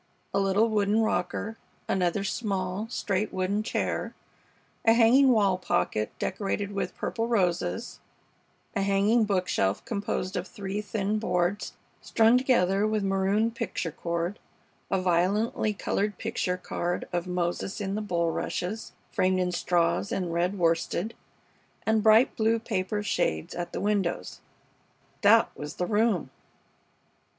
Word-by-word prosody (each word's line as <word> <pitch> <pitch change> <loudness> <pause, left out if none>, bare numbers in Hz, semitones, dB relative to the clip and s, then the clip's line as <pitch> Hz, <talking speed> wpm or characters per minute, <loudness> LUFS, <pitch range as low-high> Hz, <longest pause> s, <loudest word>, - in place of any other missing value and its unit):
A - - +2
little 195 +3 +3
wooden 210 0 +2
rocker, 220 0 -2 0.3
another 185 +1 +1
small, 195 -1 -2
straight 210 -3 -1
wooden 190 +3 0
chair, 215 - -2 0.7
a 225 - +6
hanging 245 +4 +6
wall 200 -6 +3
pocket 105 - 0
decorated 200 0 -2
with 200 - -3
purple 225 0 -2
roses, 185 0 0 0.8
a 200 - +1
hanging 200 +4 +3
bookshelf 180 - 0
composed 200 -1 -3
of 180 +1 -2
three 200 +1 -4
thin 210 +1 -1
boards 190 -1 -1 0.3
strung 225 +1 +4
together 210 -6 +3
with 215 -1 0
maroon 195 +3 +1
picture 180 -7 -3
cord, 170 +4 -3 0.5
a 190 - +1
violently 185 +5 +1
colored 205 0 -2
picture 220 -5 -2
card 175 -1 -3
of 175 +1 -1
"Moses 180 +2 -2
in 195 -1 -2
the 210 - -1
Bulrushes" 180 +2 -2 0.2
framed 185 0 +2
in 180 -1 0
straws 170 - +1
and 180 -3 -2
red 175 +4 0
worsted, 170 +4 0 0.7
and 220 0 +3
bright 220 +3 +5
blue 225 +1 +2
paper 205 -2 -2
shades 80 - -1
at 175 0 -4
the - - -4
windows. 200 -4 -1 0.8
That 225 +3 +5
was 150 +1 -7
the 180 - -1
room! 210 - +1
195 Hz, 130 wpm, -27 LUFS, 180-215 Hz, 0.8 s, a